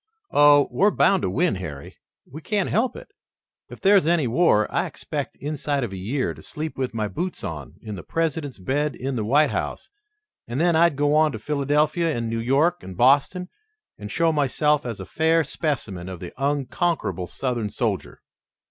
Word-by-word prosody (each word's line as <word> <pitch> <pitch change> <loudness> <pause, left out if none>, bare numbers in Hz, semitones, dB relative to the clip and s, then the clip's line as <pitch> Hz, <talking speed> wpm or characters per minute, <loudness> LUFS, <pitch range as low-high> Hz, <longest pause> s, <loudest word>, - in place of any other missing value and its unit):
Oh, 145 -1 +6
we're 205 - +4
bound 195 -2 +3
to - - 0
win, 175 -7 +1
Harry! 75 -6 -8 0.3
We 155 +5 -10
can't 205 +1 -1
help 235 +5 +1
it. - - -11 0.6
If - - -10
there's 195 -4 +5
any 170 -4 +3
war, 120 -4 +3
I - - +1
expect - - -5
inside 145 -1 -2
of 110 -5 -4
a - - -5
year 100 - -2
to 80 - -14
sleep 155 - -5
with 130 -3 -3
my 110 -2 -1
boots 175 - -4
on 75 -5 -6
in 110 - -6
the 95 - -6
President's 160 - -2
bed 135 +8 -1
in 135 +1 -3
the 110 - -1
White 145 +8 +3
House, - - -4 0.6
and 120 +3 -3
then 170 0 +3
I'd 170 -2 +4
go 145 +1 +2
on 155 0 +4
to - - -4
Philadelphia 150 +4 0
and 115 -1 -3
New 115 - -1
York 145 +9 +2
and 95 -1 -9
Boston 145 - +3 0.5
and 105 -1 -7
show 165 +7 +2
myself 150 -1 +1
as 115 -4 -5
a 95 - -6
fair 160 - +2
specimen 110 - -3
of 90 -2 -7
the 90 - -8
unconquerable 140 - -1
Southern 120 +1 -2
soldier." - - -3
145 Hz, 185 wpm, -24 LUFS, 115-160 Hz, 0.6 s, Oh